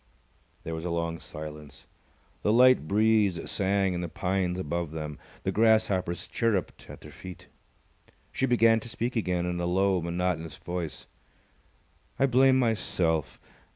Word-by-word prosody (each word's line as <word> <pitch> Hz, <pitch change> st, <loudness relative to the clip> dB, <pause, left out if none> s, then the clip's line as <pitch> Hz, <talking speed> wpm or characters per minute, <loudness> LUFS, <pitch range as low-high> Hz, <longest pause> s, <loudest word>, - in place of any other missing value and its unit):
There 80 Hz, -, -5 dB
was 80 Hz, 0 st, -5 dB
a 90 Hz, -, -2 dB
long 85 Hz, -1 st, -2 dB
silence. 75 Hz, -1 st, -9 dB, 0.6 s
The 105 Hz, -, +2 dB
light 125 Hz, -7 st, +5 dB
breeze 105 Hz, -3 st, +3 dB
sang 95 Hz, -1 st, +1 dB
in 85 Hz, -, -3 dB
the 85 Hz, -, -4 dB
pines 90 Hz, +1 st, -1 dB
above 85 Hz, -1 st, -3 dB
them. 75 Hz, -2 st, -5 dB, 0.2 s
The -, -, 0 dB
grasshoppers 105 Hz, -6 st, +2 dB
chirrupped 105 Hz, -7 st, -2 dB
at -, -, -10 dB
their -, -, -12 dB
feet. 90 Hz, -1 st, -10 dB, 0.9 s
She 135 Hz, -, 0 dB
began 115 Hz, -2 st, +4 dB
to 115 Hz, -, -10 dB
speak 120 Hz, +2 st, -3 dB
again 90 Hz, -5 st, 0 dB
in 90 Hz, 0 st, -2 dB
a 85 Hz, -, -1 dB
low, 95 Hz, +1 st, +2 dB
monotonous 85 Hz, -2 st, -2 dB
voice. 85 Hz, -3 st, -5 dB, 1.1 s
"I 135 Hz, -, +4 dB
blame 130 Hz, 0 st, +4 dB
myself! 90 Hz, -, 0 dB
90 Hz, 145 wpm, -28 LUFS, 85-110 Hz, 1.1 s, light